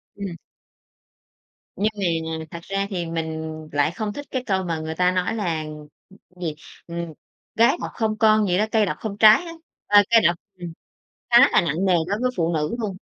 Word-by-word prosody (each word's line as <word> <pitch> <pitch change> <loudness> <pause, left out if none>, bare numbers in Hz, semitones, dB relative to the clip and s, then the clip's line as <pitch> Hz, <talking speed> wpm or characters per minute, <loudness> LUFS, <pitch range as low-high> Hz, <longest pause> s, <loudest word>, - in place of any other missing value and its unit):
Ừm. 195 -4 -6 1.4
Nhưng 215 +2 0 0.5
mà 160 - -7
thật 170 - -6
ra 195 0 -2
thì 175 -3 -3
mình 160 -1 -4 0.2
lại 145 +2 +1
không 205 +3 -4
thích 290 - -7
cái 260 -2 -2
câu 190 -3 0
mà 165 -2 -3
người 160 0 -5
ta 180 +1 +3
nói 185 +4 -1
là, 170 -7 -2 0.8
gì, 165 -4 -3 0.3
ừm: 170 -1 -5 0.4
"Gái 230 +1 +4
độc - - -4
không 215 -1 -1
con" 215 -2 +4
gì 180 - +2
đó, 215 - +2
"cây 220 -2 +3
độc - - -2
không 205 -2 -5
trái" 215 +10 +7
á, 335 - -8 0.3
ơ, 205 0 +7
cây 230 -1 +7
độc 175 - +2 0.2
ừm, 175 -2 -7 0.6
khá 240 0 +7
là - - +4
nặng 170 +3 -1
nề 185 - +3
đối 205 +3 -1
với 255 0 +1
phụ 170 0 +1
nữ 155 +6 -1
luôn. 205 -5 -3
190 Hz, 195 wpm, -23 LUFS, 170-215 Hz, 1.4 s, trái